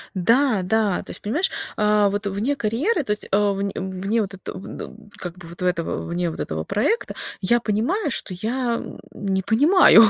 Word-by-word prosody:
Да 230 +4 +3
да, 210 0 +1
то - - -18
есть - - -5
понимаешь, 295 - +1 0.3
а 210 -1 +4
вот 205 +1 -2
вне 210 +9 0
карьеры, 275 - +1
то 210 - -3
есть, 210 - -2
э, 200 - +5
в 205 -1 +3
вне 195 +2 -1
вот 195 -1 -3
этот, 190 - -7
э, 190 - -7 0.3
как 180 0 -6
бы 180 - -11
вот 170 +2 -11
этого, 180 -2 -1
вне 175 +1 -1
вот 160 - -7
этого 80 0 -2
проекта 275 - 0 0.3
я 235 +5 +3
понимаю, 245 - 0
что 195 - 0
я 235 +5 -1 0.3
не 195 -2 -1
понимаю, 275 - +7
210 Hz, 185 wpm, -23 LUFS, 190-235 Hz, 0.3 s, понимаю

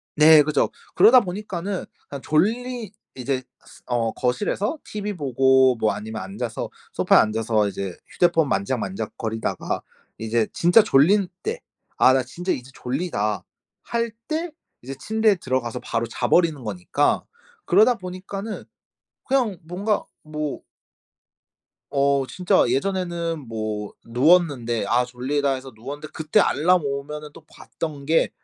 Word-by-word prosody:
네 155 0 +8
그렇죠. 150 0 +1 0.2
그러다 250 +2 +7
보니까는 190 -1 -4 0.2
그냥 140 -1 -7
졸리 225 - 0 0.2
이제 130 0 -2 0.2
스 - - -17
어 120 -2 0
거실에서 200 - -1
티비 210 0 -4
보고 130 -3 +4
뭐 110 -2 +1
아니면 110 +2 -6
앉아서 105 +5 -5 0.2
소파에 - - +4
앉아서 110 -1 +1
이제 100 -3 -5
휴대폰 165 -3 +2
만지작만지작거리다가 110 +1 -2 0.4
이제 110 0 0
진짜 175 +7 +5
졸릴 190 +4 +4 0.2
때 460 +3 -3 0.4
'아 - - +6
나 130 -1 +2
진짜 175 +9 -4
이제 125 0 -4
졸리다.' 125 - -2 0.4
할 235 -1 -2 0.2
때 325 +2 -2 0.3
이제 135 +3 -7
침대에 220 +6 +2
들어가서 130 -8 -2
바로 115 0 -2
자버리는 160 +5 +1
거니까. 105 +7 0 0.4
그러다 215 +7 +5
보니까는 195 +2 -6 0.6
그냥 250 -7 +1
뭔가 195 +6 -1 0.2
뭐 150 -1 -4 1.3
어. 140 -1 +2
진짜 180 - +2
예전에는 170 +3 -1
뭐 110 -2 -4
누웠는데, 125 - +2
'아 125 +4 +2
졸리다.' 135 +3 -1
해서 130 0 -9
누웠는데 140 +7 -7
그때 160 +6 +1
알람 180 -1 +3
오면은 145 +2 -4
또 165 - -13
봤던 150 -3 -7
게 160 +3 +3
145 Hz, 285 characters per minute, -23 LUFS, 120-185 Hz, 1.3 s, 네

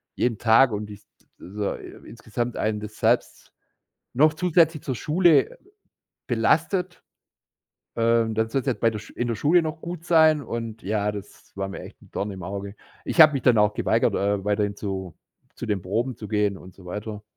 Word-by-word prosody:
jeden 115 -3 0
Tag 120 +2 +5
und 105 0 -4
ist 105 0 -12 0.3
so 100 +2 -4
i - - -11
insgesamt 120 +1 -5
einen 110 -1 -1
das 105 0 -8
selbst 115 +2 0 0.6
noch 155 +5 +4
zusätzlich 165 -3 +2
zur 130 - -3
Schule 155 - +3 0.7
belastet. 180 -2 0 0.9
Ähm, 115 -1 +2
dann 110 0 0
sollst 135 +3 -2
du - - +3
jetzt - - -6
bei 115 - +4
der 105 - -5
Sch 110 - -13
in 120 - -3
der 115 - -1
Schule 160 +10 +3
noch 160 0 -4
gut 170 -1 -6
sein 160 -3 +5
und, 115 -3 -6
ja, 105 0 0
das 100 -1 -11
war 100 0 -3
mir 95 - -7
echt - - -12
'n - - -20
Dorn 100 +1 -3
im 95 -2 -8
Auge. 100 +2 -6 0.3
Ich - - +4
habe 155 -1 +8
mich 135 - -1
dann 120 -3 +4
auch 105 0 +3
geweigert, - - +1
äh, 100 -1 0
weiterhin 105 0 0
zu 95 -4 -5 0.4
zu - - -6
den 100 -4 -1
Proben 115 +7 -2
zu 105 - -9
gehen 105 -2 0
und 90 0 -14
so 95 - -16
weiter. 105 +3 -6
110 Hz, 195 wpm, -24 LUFS, 105-135 Hz, 0.9 s, habe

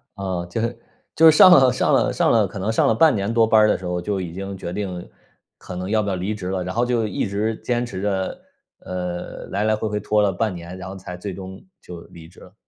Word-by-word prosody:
哦， 95 -3 -3
就 110 - -3
是 115 0 -3 0.4
就 160 0 +7
是 155 - +4
上 185 - +9
了 130 -6 +7
上 - - +1
了 - - +3
上 - - +2
了 - - +3
可 - - -8
能 105 +4 -1
上 - - +2
了 110 - +3
半 155 -2 +4
年 100 +3 -2
多 115 -1 +4
班 110 -1 +5
儿 105 - +5
的 - - +2
时 95 - -10
候， 90 0 -2
就 100 +1 -2
已 85 -2 -6
经 95 +1 -6
决 85 -1 -6
定 90 -4 -5 0.5
可 90 - -9
能 90 +2 -5
要 110 0 +2
不 100 - -2
要 95 - -1
离 95 +4 -3
职 95 -4 -6
了， 95 -1 -2
然 95 +3 -5
后 120 +1 +2
就 120 -3 0
一 100 - -2
直 105 +3 -1
坚 120 0 -2
持 95 -5 -6
着， 95 -2 -2 0.4
呃， 90 -1 -6
来 100 +2 -2
来 110 0 +2
回 110 +1 -3
回 105 0 -2
拖 105 +1 +1
了 100 -2 +2
半 105 +2 -1
年， 85 +1 -9
然 95 0 -8
后 95 - -8
才 90 -1 -8
最 95 +1 -6
终 95 0 -9 0.2
就 85 -1 -10
离 80 -1 -14
职 85 - -19
了。 90 - -15
100 Hz, 295 characters per minute, -22 LUFS, 90-110 Hz, 0.5 s, 上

